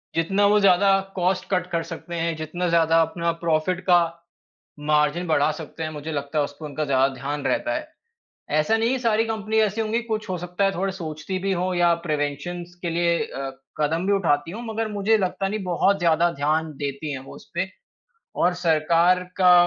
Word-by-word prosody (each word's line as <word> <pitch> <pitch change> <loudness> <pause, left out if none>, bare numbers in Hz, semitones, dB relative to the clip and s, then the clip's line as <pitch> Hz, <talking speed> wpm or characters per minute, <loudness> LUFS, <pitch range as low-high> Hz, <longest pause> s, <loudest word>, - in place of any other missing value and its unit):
जितना 195 +5 +2
वो 210 +1 +4
ज़्यादा 195 0 +5 0.2
कॉस्ट 185 0 0
कट 180 -2 0
कर 170 -1 0
सकते 170 +1 -7
हैं, 165 -1 -1
जितना 165 +3 -3
ज़्यादा 165 -1 +4
अपना 170 +1 0
प्रॉफिट 165 +2 +1
का 175 -1 +7 0.9
मार्जिन 150 +3 +2
बढ़ा 155 -2 +3
सकते 160 +1 -8
हैं, 155 - -2
मुझे 155 +1 -6
लगता 145 +1 -2
है 145 - +3
उस 145 - -7
पर 155 - -5
उनका 150 +1 -3
ज़्यादा 135 -1 +2
ध्यान 140 +2 -4
रहता 305 0 0
है। 305 0 -4 0.7
ऐसा 220 +9 +2
नहीं 225 +1 +1
कि 260 0 0
सारी 225 -2 +2
कंपनी 220 -1 -2
ऐसी 215 +1 +1
होंगी 220 +2 0
कुछ 220 -3 -4
हो 185 - -1
सकता 180 +3 -3
है 195 - +3
थोड़े 195 +2 -1
सोचती 165 0 -5
भी 195 +1 -1
हों 180 +1 -1
या 175 -1 +4
प्रिवेंशन्सज़ 155 +4 -3
के 175 - -2
लिए 170 0 +2
अ, 135 -10 -5 0.3
कदम 160 +4 0
भी 200 - +3
उठाती 165 -5 +1
हों। 225 +5 -6
मगर 225 0 -1
मुझे 210 +2 +2
लगता 195 0 -1
नहीं 210 0 -3
बहुत 190 +2 +2
ज़्यादा 170 0 +3
ध्यान 155 +2 0
देती 145 +1 -4
हैं 135 - -4
वो - - -10
उस - - -15
पे। 180 +2 -1 0.7
और 180 +1 +2
सरकार 170 +3 +3 0.2
का 180 -1 +8
175 Hz, 200 wpm, -24 LUFS, 155-195 Hz, 0.9 s, का